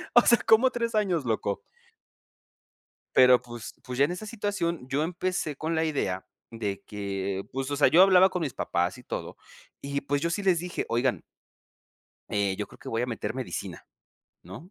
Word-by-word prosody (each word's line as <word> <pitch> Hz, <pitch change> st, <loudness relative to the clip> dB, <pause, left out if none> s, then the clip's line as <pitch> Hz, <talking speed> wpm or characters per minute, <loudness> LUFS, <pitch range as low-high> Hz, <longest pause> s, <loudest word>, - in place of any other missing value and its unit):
O 240 Hz, -, +10 dB
sea, 235 Hz, -, +6 dB
¿cómo 230 Hz, +4 st, +6 dB
3 235 Hz, -2 st, -2 dB
años, 180 Hz, -9 st, +1 dB
loco? 110 Hz, -3 st, -1 dB, 1.6 s
Pero 125 Hz, -1 st, +7 dB
pues 120 Hz, -3 st, -9 dB
pues, 125 Hz, 0 st, -6 dB
ya 140 Hz, -, +6 dB
en -, -, -3 dB
esa 180 Hz, +4 st, -6 dB
situación 200 Hz, -, -2 dB
yo 145 Hz, +3 st, +1 dB
empecé 180 Hz, -3 st, -2 dB
con 160 Hz, +3 st, -2 dB
la 160 Hz, -, +2 dB
idea 95 Hz, -12 st, -2 dB, 0.2 s
de 105 Hz, -4 st, -4 dB
que, 100 Hz, -1 st, -3 dB
pues, 135 Hz, +1 st, -3 dB
o -, -, 0 dB
sea, 145 Hz, -, +5 dB
yo 175 Hz, -, +6 dB
hablaba 190 Hz, 0 st, +7 dB
con 180 Hz, -2 st, -3 dB
mis 145 Hz, -5 st, -2 dB
papás 90 Hz, +5 st, -1 dB
y -, -, -14 dB
todo, -, -, -6 dB, 0.4 s
y 140 Hz, 0 st, -3 dB
pues, 140 Hz, +1 st, -1 dB
yo 170 Hz, -, 0 dB
sí 195 Hz, +4 st, -2 dB
les 180 Hz, -4 st, +3 dB
dije: 180 Hz, 0 st, -4 dB
"Oigan". 120 Hz, +2 st, +1 dB, 1.1 s
Eh, 100 Hz, -2 st, 0 dB
yo 105 Hz, -, -3 dB
creo -, -, -17 dB
que -, -, -8 dB
voy 115 Hz, +1 st, -1 dB
a -, -, +1 dB
meter 110 Hz, -3 st, -4 dB
medicina, 130 Hz, -1 st, -5 dB, 0.6 s
¿no? 105 Hz, -, -11 dB
140 Hz, 190 wpm, -27 LUFS, 115-180 Hz, 1.6 s, O